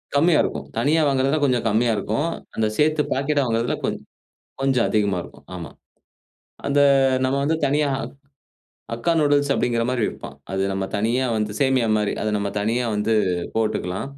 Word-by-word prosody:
கம்மியா 155 +2 +4
இருக்கும். - - -4
தனியா 155 +3 +2
வாங்குறதுல 135 +2 +2
கொஞ்சம் 125 -4 +1
கம்மியா 115 +2 +2
இருக்கும். 110 +10 -1 0.3
அந்த 110 -1 +1
சேத்து 155 0 +3
பாக்கெட்டா 140 +1 +1
வாங்குறதுல, 115 0 0
கொஞ் - - -1 0.6
கொஞ்சம் 135 -3 +2
அதிகமா 100 -4 +1
இருக்கும், - - -15
ஆமா. 85 - -7 1.0
அந்த 140 0 +2 0.4
நம்ம 130 +1 +1
வந்து 160 +2 +1
தனியா 145 +1 +1 1.0
ஹக்கா 115 +9 0
நூடில்ஸ் 145 -1 +2
அப்டிங்கிற 115 -1 0
மாரி 125 -3 -1
வைப்பான். 70 - -7 0.2
அது 95 0 0
நம்ம 95 0 -2
தனியா 120 +5 +1
வந்து, 105 -1 -1
சேமியா 130 -4 +2
மாரி. 105 -1 0
அத 110 - 0
நம்ம 100 0 -2
தனியா 115 +4 0
வந்து 105 +2 0 0.4
போட்டுக்கலாம். 110 -1 -1
125 Hz, 150 wpm, -22 LUFS, 110-140 Hz, 1.0 s, கம்மியா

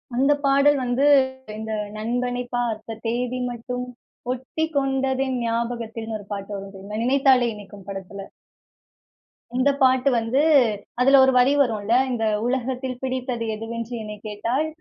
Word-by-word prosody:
அந்த 275 +4 +3
பாடல் 280 +1 +5
வந்து, 250 +3 +1 0.5
இந்த 220 0 -5 0.3
நண்பனை 245 +2 -2
பார்த்த 225 -2 -3
தேதி 245 +2 -1
மட்டும், 250 +1 -5 0.5
ஒட்டிக் 315 +5 -4
கொண்டதென் 270 -1 0
ஞாபகத்தில்ன்னு 230 -1 -3
1 205 - -12
பாட்டு 200 0 -6
வரும் 195 0 -8
தெரியுமா? 200 +3 -7
நினைத்தாலே 260 -1 +4
இனிக்கும் 200 -1 -12
படத்துல. 195 0 -7 1.3
இந்த 270 +2 +3
பாட்டு 260 +1 +4
வந்து 235 +5 +1 0.6
அதில 270 +2 +6
1 265 - +5
வரி 260 +3 +4
வரும்ல, 220 -3 -1 0.2
"இந்த 225 -2 -1 0.2
உலகத்தில் 255 0 -2
பிடித்தது 255 -2 -2
எதுவென்று 230 +2 -6
என்னை 210 0 -6
கேட்டால், 230 +9 -1
245 Hz, 125 wpm, -23 LUFS, 225-260 Hz, 1.3 s, அதில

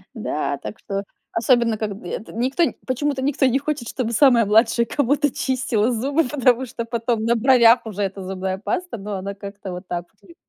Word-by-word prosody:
Да, 145 -9 -2
так 215 - -8
что 195 0 -4 0.3
особенно 230 -1 +2
когд 205 -2 -5
эт 215 - -5
никто 260 +9 +1 0.2
почему-то 270 +1 -1
никто 270 0 +1
не 260 +2 +3
хочет, 285 -5 -3
чтобы 240 -3 -3
самая 235 -2 +5
младшая 225 +3 +3
кому-то 285 +3 +1
чистила 245 -3 0
зубы, 275 +7 +1
потому 260 -2 +2
что 235 -1 -5
потом 230 -1 -1
на 235 +1 +3
бровях 240 -1 +5
уже 205 -2 -5
эта 195 0 -4
зубная 190 0 -3
паста, 360 - -3
но 205 0 -5
она 200 +1 -5
как-то 200 -1 -8
вот 180 +1 -8
так 175 0 -3 0.2
вот - - -21
лю 335 - -15
230 Hz, 190 wpm, -22 LUFS, 205-260 Hz, 0.3 s, самая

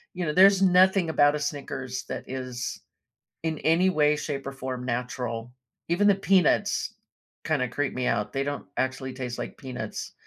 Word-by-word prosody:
you 180 - -2
know, 150 - -1
there's 195 +2 +7
nothing 185 -1 +5
about 145 -1 +4
a 150 - -2
Snickers 130 -3 -4
that - - -4
is 130 -2 -5 0.6
in 160 -2 -1
any 170 +4 +3
way, 150 -4 +3
shape 140 -2 -4
or 135 - -4
form 130 -2 -5
natural. 120 -1 -3 0.4
Even 175 +5 +2
the 200 - +6
peanuts 190 -3 +2 0.5
kinda 145 -5 +1
creep 145 +1 -2
me 125 0 -2
out, 105 -3 0
they 135 - 0
don't 145 0 -4
actually 130 0 -2
taste 125 -2 -5
like - - -5
peanuts. 130 -2 -6
140 Hz, 170 wpm, -26 LUFS, 130-165 Hz, 0.6 s, there's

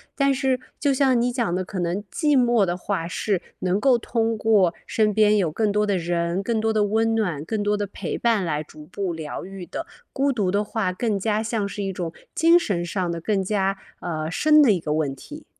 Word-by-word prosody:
但 275 -1 +3
是 265 -1 0 0.2
就 285 -2 +2
像 260 -2 +3
你 245 +1 +1
讲 235 -8 -1
的 185 0 -2
可 190 -1 -5
能 175 +4 -1
寂 295 -5 +2
寞 240 -3 +3
的 175 0 -2
话 180 -3 -3
是， 190 0 -1 0.2
能 185 +2 0
够 255 0 +4
通 225 -1 -1
过 205 -6 +3
身 215 -1 +1
边 210 0 +4
有 170 -6 +1
更 210 +4 0
多 210 +1 +2
的 200 -2 +1
人、 170 +2 -1
更 225 -1 0
多 225 0 +1
的 215 -1 +2
温 225 +2 +1
暖、 175 -10 -1
更 210 +4 -2
多 205 0 +1
的 205 -1 -2
陪 - - -5
伴 225 -6 +2
来 150 -2 -1
逐 150 0 -14
步 185 0 -3
疗 155 -2 -6
愈 190 -2 -8
的。 - - -6 0.3
孤 275 0 +1
独 200 -7 0
的 205 +1 +1
话， 205 -3 -2
更 210 +1 -1
加 215 +2 0
像 215 -2 -1
是 205 - -6
一 195 - -2
种 170 -3 -4 0.2
精 335 +2 +6
神 175 - -2
上 180 -1 -2
的 170 - -4
更 195 +2 0
加， 195 -1 0 0.2
呃， 155 -2 -3
深 305 - +5
的 250 -7 +6
一 185 - +2
个 150 -2 -2
问 145 -3 -1
题。 - - -11
205 Hz, 245 characters per minute, -23 LUFS, 180-225 Hz, 0.3 s, 精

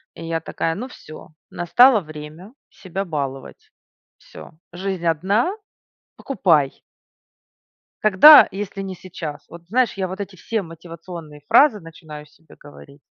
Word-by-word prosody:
и 165 - -9
я 165 0 -2
такая: 165 +1 -3
ну 240 +8 -6
всё, 155 -11 -13 0.2
настало 225 +7 +4
время 155 +5 -11 0.2
себя 190 +1 -6
баловать, 140 -5 -6 0.5
всё. - - -14 0.2
Жизнь 185 -1 -5
одна- 195 - +1 0.7
покупай! 165 - 0 1.2
Когда, 215 +9 +8
если 195 0 -6
не 190 -1 -6
сейчас. 165 -5 -9
Вот 170 +1 -14
знаешь, 245 +4 +1
я 190 -2 -3
вот 190 +2 -8
эти 200 -1 -7
все 220 +5 -3
мотивационные 165 -2 -11
фразы 270 -8 +5
начинаю 155 -2 -12
себе 160 +2 -21
говорить, 145 -1 -16
175 Hz, 130 wpm, -21 LUFS, 155-195 Hz, 1.2 s, Когда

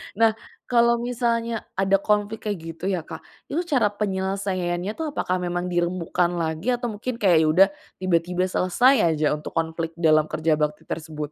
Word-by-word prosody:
Nah 225 +2 +4 0.4
kalau 235 -1 +3
misalnya 235 -2 -1
ada 195 0 +4
konflik 210 +2 -1
kayak 205 -3 -2 0.2
gitu 170 - -7
ya 180 -3 -1
Kak, - - -8 0.3
itu 310 - 0
cara 265 -9 +3
penyelesaiannya 190 -2 -2
tuh 315 -2 -2
apakah 185 -6 0
memang 175 0 -2
dirembukan 175 0 0
lagi 160 +7 -1
atau 240 -1 -1
mungkin 240 +4 -4
kayak 185 -5 +4
ya - - +2
udah 180 +5 +6 0.3
tiba-tiba 180 0 +1
selesai 210 +9 +3 0.2
aja 150 0 +1
untuk 150 - -8
konflik 165 0 -2
dalam 155 -2 +4
kerja 160 0 +1
bakti 150 0 -1
tersebut? 155 -2 -5
185 Hz, 165 wpm, -24 LUFS, 165-220 Hz, 0.4 s, udah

